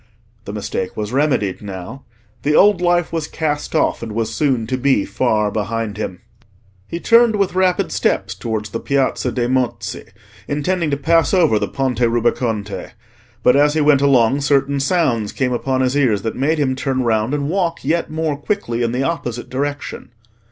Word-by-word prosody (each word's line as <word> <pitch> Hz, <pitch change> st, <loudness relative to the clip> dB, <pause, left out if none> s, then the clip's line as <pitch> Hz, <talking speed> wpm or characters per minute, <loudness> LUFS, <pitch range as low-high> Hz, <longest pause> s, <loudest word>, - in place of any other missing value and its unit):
The 100 Hz, -, -6 dB
mistake 100 Hz, -3 st, -4 dB
was 105 Hz, +2 st, -4 dB
remedied 130 Hz, -9 st, +1 dB
now: 100 Hz, +6 st, -8 dB, 0.4 s
the 150 Hz, +1 st, +1 dB
old 205 Hz, -2 st, +5 dB
life 175 Hz, -1 st, +1 dB
was 160 Hz, -2 st, -2 dB
cast 150 Hz, -3 st, -3 dB
off, -, -, +1 dB
and 115 Hz, -2 st, -6 dB
was 115 Hz, 0 st, -2 dB
soon 130 Hz, -6 st, +1 dB
to 130 Hz, -, -2 dB
be 130 Hz, -5 st, +2 dB
far 105 Hz, -1 st, 0 dB
behind 110 Hz, 0 st, -2 dB
him. 95 Hz, -4 st, -5 dB, 0.7 s
He 170 Hz, -, -5 dB
turned 230 Hz, +2 st, +4 dB
with 200 Hz, -3 st, 0 dB
rapid 185 Hz, -1 st, +1 dB
steps -, -, 0 dB
towards 110 Hz, -3 st, -4 dB
the 115 Hz, -, -3 dB
Piazza 135 Hz, -2 st, 0 dB
dei 120 Hz, +1 st, -1 dB
Mozzi, 125 Hz, 0 st, -2 dB, 0.4 s
intending 160 Hz, +3 st, -1 dB
to 140 Hz, -, 0 dB
pass 165 Hz, +6 st, +2 dB
over 160 Hz, -, +3 dB
the -, -, -1 dB
Ponte 130 Hz, -4 st, -2 dB
Rubaconte; 115 Hz, -3 st, -1 dB, 0.5 s
but 125 Hz, -, +5 dB
as 145 Hz, +1 st, +4 dB
he 155 Hz, -, +2 dB
went 145 Hz, -2 st, +4 dB
along 135 Hz, -1 st, +3 dB
certain 140 Hz, 0 st, +1 dB
sounds 135 Hz, -, +1 dB
came 125 Hz, -2 st, -1 dB
upon 130 Hz, +2 st, -1 dB
his 130 Hz, +1 st, +1 dB
ears 120 Hz, -9 st, +2 dB
that 110 Hz, -, -3 dB
made 145 Hz, +5 st, +1 dB
him 130 Hz, -3 st, +1 dB
turn 130 Hz, -1 st, -1 dB
round 115 Hz, +3 st, +1 dB
and 140 Hz, -1 st, -2 dB
walk 170 Hz, -2 st, -1 dB
yet 165 Hz, +4 st, 0 dB
more 155 Hz, -1 st, -1 dB
quickly 145 Hz, -, -2 dB
in 115 Hz, 0 st, 0 dB
the 130 Hz, +2 st, 0 dB
opposite 125 Hz, -7 st, -3 dB
direction. 145 Hz, +2 st, -4 dB
135 Hz, 180 wpm, -19 LUFS, 115-150 Hz, 0.7 s, old